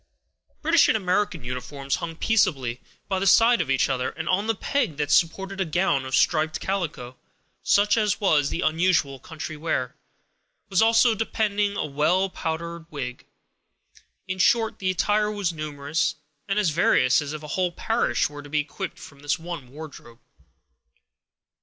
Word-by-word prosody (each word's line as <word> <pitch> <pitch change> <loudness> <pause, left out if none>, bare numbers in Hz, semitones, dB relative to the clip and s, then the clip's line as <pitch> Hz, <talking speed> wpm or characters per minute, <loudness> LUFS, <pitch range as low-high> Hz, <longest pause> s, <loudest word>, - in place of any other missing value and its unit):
British 325 +1 +5
and - - +3
American 185 - -1
uniforms 130 +3 -4
hung 165 -1 -5
peaceably 145 - +1 0.3
by 190 -2 -1
the 195 - 0
side 230 +4 +5
of - - -4
each 135 -1 +2
other; 130 -2 -1
and 160 +1 -7
on 200 +4 +1
the 225 - +1
peg 235 - -1
that 150 -1 -1
supported 195 +3 +1
a - - +4
gown 155 -5 0
of 130 0 -1
striped 155 -1 +2
calico, 160 -10 -4 0.4
such 205 +1 +3
as 210 -2 +1
was 155 -9 +2
the 175 - -3
usual 160 -6 +1
country 155 +1 -7
wear, 150 -5 -2 0.8
was 190 0 +2
also 230 +1 +5
depending 210 -2 -1
a - - -1
well 155 +7 +1
powdered 170 0 -5
wig: 130 -5 -6 1.0
in 190 0 -4
short, 225 +4 +2
the 185 - -1
attire 210 +3 +1
was 200 -5 -2
numerous 150 -1 -2 0.3
and 195 0 -1
as 205 -6 +2
various 130 -5 +3
as 145 -1 -5
if 155 0 -6
a 150 - -8
whole 180 +3 0
parish 225 +6 0
were 145 0 -9
to 145 - -12
be 150 +1 +1
equipped 185 +6 -6
from 140 - -13
this 145 0 -1
one 165 -6 -7
wardrobe. 140 -5 -11
170 Hz, 165 wpm, -24 LUFS, 145-200 Hz, 1.0 s, British